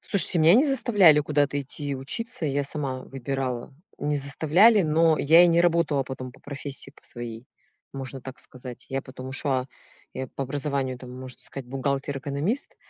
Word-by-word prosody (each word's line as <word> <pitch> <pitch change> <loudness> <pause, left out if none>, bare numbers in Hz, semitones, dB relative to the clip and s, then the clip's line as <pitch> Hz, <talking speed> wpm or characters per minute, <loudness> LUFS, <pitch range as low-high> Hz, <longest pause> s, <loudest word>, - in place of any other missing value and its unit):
Слушайте 190 -3 +2
меня 160 +4 +6
не 265 +6 +6
заставляли 205 - +5
куда-то 145 -1 +1
идти 145 +1 -5
учиться, 180 - -5
я 140 0 0
сама 140 -3 -3
выбирала. 135 -1 -4 0.3
Не 150 0 -1
заставляли, 165 +10 +4
но 160 0 +3
я 165 +4 +7
и - - +6
не 170 0 +4
работала 170 -5 +2
потом 130 -1 -7
по - - -19
профессии 140 -1 -3
по - - -21
своей, 120 0 -6 0.5
можно 135 -1 -7
так 130 +1 -9
сказать. 125 -1 -9
Я 135 0 -2
потом 130 0 -9
ушла 130 -1 +1 0.5
я 130 -1 -4
по 135 - -4
образованию 135 -2 -2
там 125 -1 -10
можно 130 -1 -9
сказать 135 -3 -8
бухгалтер-экономист, 140 - -2
140 Hz, 165 wpm, -25 LUFS, 130-160 Hz, 0.5 s, я